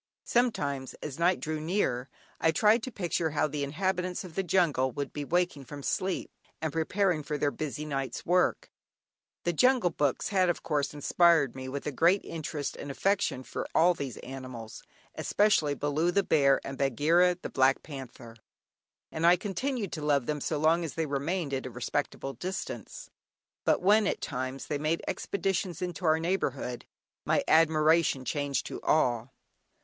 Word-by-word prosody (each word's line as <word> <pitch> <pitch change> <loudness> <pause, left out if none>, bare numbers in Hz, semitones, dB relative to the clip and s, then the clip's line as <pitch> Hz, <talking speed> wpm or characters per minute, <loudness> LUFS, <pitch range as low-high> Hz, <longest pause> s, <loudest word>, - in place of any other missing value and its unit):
Sometimes, 145 - 0
as 150 0 -6
night 175 +2 +3
drew 155 0 -3
near, 150 -7 -1 0.3
I 160 - +3
tried 215 +7 +4
to 255 - -5
picture 175 -5 -1
how 150 0 +1
the 150 -1 -2
inhabitants 180 +5 -1
of 180 -3 -10
the 195 - 0
jungle 165 -8 +2
would 140 +3 -4
be 145 - -4
waking 175 -3 0
from 145 +1 -9
sleep 185 +5 -1 0.3
and 160 -1 -3
preparing 175 +1 +1
for 150 0 -3
their 145 0 +1
busy 150 0 -4
night's 135 -3 -3
work. 180 +1 +1 0.7
The 175 - 0
"Jungle 250 -1 +3
Books" 145 -4 0
had 185 -3 +3
of 175 - -1
course 150 -2 -1
inspired 160 -2 +3
me 130 0 -6
with 140 +1 -5
a 150 - -1
great 170 +8 +3
interest 155 -2 -4
and 145 - -7
affection 165 -2 0
for - - -5
all 175 +3 +5
these 140 -7 -5
animals, 130 -4 -8 0.3
especially 180 -9 +2
"Baloo" 145 +5 0
the 200 +2 +2
bear, 140 -6 +4
and 135 -1 -6
"Bagheera" 165 +7 +3
the - - -6
black 130 +1 +3
panther, 130 -5 -9 0.8
and 160 - -4
I 175 +1 +7
continued 205 +3 -3
to 155 - -5
love 145 -4 +2
them 150 +1 -2
so 155 - -1
long 160 +3 +3
as 160 - -5
they 165 - 0
remained 145 +2 -2
at 130 -1 -2
a - - -6
respectable 135 +2 -3
distance, 190 - -6 0.5
but - - +2
when, 210 +2 +5
at - - -1
times, 130 0 -4
they 145 - -2
made 155 +3 0
expeditions 190 -3 -2
into 180 0 -4
our 160 0 +4
neighbourhood, 140 -8 -2 0.4
my - - +1
admiration 155 -3 +4
changed 145 -1 -1
to - - -6
awe. 120 -6 +2
155 Hz, 170 wpm, -29 LUFS, 140-180 Hz, 0.8 s, I